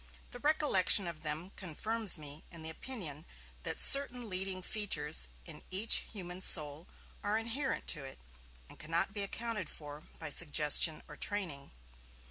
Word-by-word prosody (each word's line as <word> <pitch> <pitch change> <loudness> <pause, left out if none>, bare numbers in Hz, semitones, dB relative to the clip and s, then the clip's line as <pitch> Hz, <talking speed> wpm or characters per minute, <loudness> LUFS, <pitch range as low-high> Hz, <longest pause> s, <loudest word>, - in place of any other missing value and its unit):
The 245 - -7
recollection 280 - +4
of 170 -3 -6
them 155 +4 -4
confirms 210 +4 +1
me 150 0 -4
in 165 -2 -10
the 160 - 0
opinion 160 - -5 0.4
that - - -5
certain 250 -4 +4
leading 185 0 -1
features 160 - +1 0.2
in - - -8
each 195 +5 +4
human 180 -3 -7
soul 155 -2 +2 0.4
are 205 +1 0
inherent 235 +5 -3
to 150 -4 -3
it, 135 - -9 0.5
and - - -15
cannot 165 +5 -1
be 205 - -2
accounted 210 -2 -3
for 150 -1 -9 0.2
by 160 -2 -5
suggestion 155 0 +4
or 150 - -11
training. 175 -10 -3
180 Hz, 145 wpm, -33 LUFS, 155-215 Hz, 0.5 s, recollection